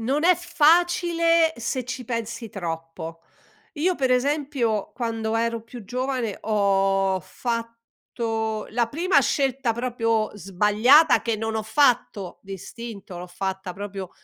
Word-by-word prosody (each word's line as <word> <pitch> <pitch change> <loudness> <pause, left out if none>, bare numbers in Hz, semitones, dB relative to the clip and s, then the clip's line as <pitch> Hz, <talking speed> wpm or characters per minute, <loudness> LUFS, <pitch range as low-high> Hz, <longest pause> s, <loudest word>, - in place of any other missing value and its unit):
non 270 +6 0
è 365 +1 +6
facile 335 0 +3
se 235 +2 -3
ci 255 0 -5
pensi 230 -1 -4
troppo. 165 -2 -6 0.5
Io 350 +4 +1
per 265 -5 0
esempio, 255 -5 0
quando 225 -2 -2
ero 230 0 -1
più 230 +1 -10
giovane 250 -1 -2
ho 195 -2 +2
fatto 230 0 -4
la 235 +1 +1
prima 330 +2 +3
scelta 270 -3 +1
proprio 230 -2 0
sbagliata, 210 - +4
che 230 -2 -1
non 225 +1 -3
ho 220 - -1
fatto 220 -5 +1
di 195 0 -7
istinto, 200 -1 -9
l'ho 180 - -7
fatta 190 +1 -4
proprio 195 -2 -6
230 Hz, 125 wpm, -24 LUFS, 205-265 Hz, 0.5 s, è